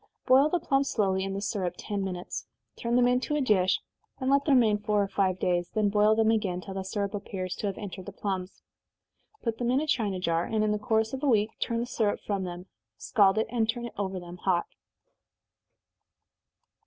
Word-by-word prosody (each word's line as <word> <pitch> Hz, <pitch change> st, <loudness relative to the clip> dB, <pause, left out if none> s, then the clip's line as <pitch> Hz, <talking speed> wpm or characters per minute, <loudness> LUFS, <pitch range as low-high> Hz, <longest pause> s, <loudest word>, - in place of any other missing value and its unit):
Boil 270 Hz, +3 st, +6 dB
the 355 Hz, -, +1 dB
plums 275 Hz, -2 st, +1 dB
slowly 190 Hz, -3 st, +1 dB
in 195 Hz, 0 st, -3 dB
the 200 Hz, -, -3 dB
syrup 195 Hz, -4 st, -2 dB
ten 200 Hz, -2 st, -3 dB
minutes 180 Hz, -2 st, -5 dB, 0.3 s
turn 235 Hz, 0 st, -1 dB
them 245 Hz, 0 st, +5 dB
into 250 Hz, +4 st, +1 dB
a -, -, +1 dB
dish, 200 Hz, -8 st, +3 dB, 0.4 s
and 260 Hz, 0 st, 0 dB
let 280 Hz, 0 st, +3 dB
them 285 Hz, -, +4 dB
remain 220 Hz, -4 st, +4 dB
four 210 Hz, -1 st, +1 dB
or -, -, -2 dB
five 190 Hz, -2 st, +1 dB
days, 175 Hz, -1 st, 0 dB
then 210 Hz, -2 st, +3 dB
boil 210 Hz, +1 st, +4 dB
them 220 Hz, 0 st, +3 dB
again, 195 Hz, -5 st, 0 dB
till 195 Hz, +1 st, -8 dB
the 190 Hz, -, -3 dB
syrup 200 Hz, +1 st, -3 dB
appears 185 Hz, -3 st, -4 dB
to 205 Hz, -, -3 dB
have 195 Hz, -, -3 dB
entered 190 Hz, -3 st, -7 dB
the -, -, -5 dB
plums. 190 Hz, -2 st, -4 dB, 0.8 s
Put 230 Hz, -2 st, -2 dB
them 240 Hz, -1 st, 0 dB
in 255 Hz, +2 st, +3 dB
a 310 Hz, -, -1 dB
china 220 Hz, -10 st, 0 dB
jar, 170 Hz, -1 st, +1 dB
and 220 Hz, -1 st, 0 dB
in 215 Hz, -, +2 dB
the 210 Hz, -, 0 dB
course 220 Hz, +1 st, +1 dB
of 265 Hz, -, -4 dB
a 295 Hz, -, 0 dB
week 215 Hz, -2 st, +3 dB
turn 230 Hz, -1 st, -1 dB
the -, -, -1 dB
syrup 220 Hz, -4 st, 0 dB
from 200 Hz, -2 st, -1 dB
them, 175 Hz, 0 st, -7 dB, 0.3 s
scald 200 Hz, -1 st, +3 dB
it, 220 Hz, -, +2 dB
and 225 Hz, -2 st, +1 dB
turn 240 Hz, +1 st, -1 dB
it 235 Hz, -, -7 dB
over 190 Hz, -2 st, -3 dB
them 175 Hz, 0 st, -10 dB
hot. 180 Hz, -1 st, +1 dB
210 Hz, 215 wpm, -28 LUFS, 190-235 Hz, 0.8 s, Boil